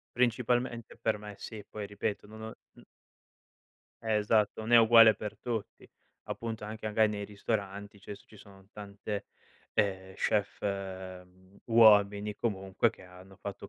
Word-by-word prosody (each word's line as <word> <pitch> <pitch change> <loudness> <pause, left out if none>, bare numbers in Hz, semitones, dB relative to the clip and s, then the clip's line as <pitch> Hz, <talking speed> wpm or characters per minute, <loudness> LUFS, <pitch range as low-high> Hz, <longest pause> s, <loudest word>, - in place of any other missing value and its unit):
Principalmente 120 -1 0
per - - -1
me 105 -1 -9
sì, 105 0 -8
poi 105 -1 -6
ripeto, 105 +1 -4
non 110 +1 -11
ho 110 - -7 0.2
n - - -17 1.2
Eh 110 -1 +1
esatto, 105 0 +2
non 110 +2 -3
è 120 - +10
uguale 115 -1 +8
per 105 0 -7
tutti, 115 -3 -5 0.4
appunto 115 -2 -5
anche 110 +1 -6
magari 110 0 +3
nei 100 -1 -4
ristoranti, 100 -1 -4
cioè 100 - -8
s - - -17
ci 110 - -17
sono 95 -1 -16
tante, 100 0 -6 0.5
ehm, 95 -2 -1
chef, 105 +1 0
mhmm, 95 -1 -6
uomini 105 -2 +5
comunque 95 -4 0
che - - -17
hanno 90 +1 -15
fatto 100 0 -8
105 Hz, 150 wpm, -30 LUFS, 100-110 Hz, 1.2 s, è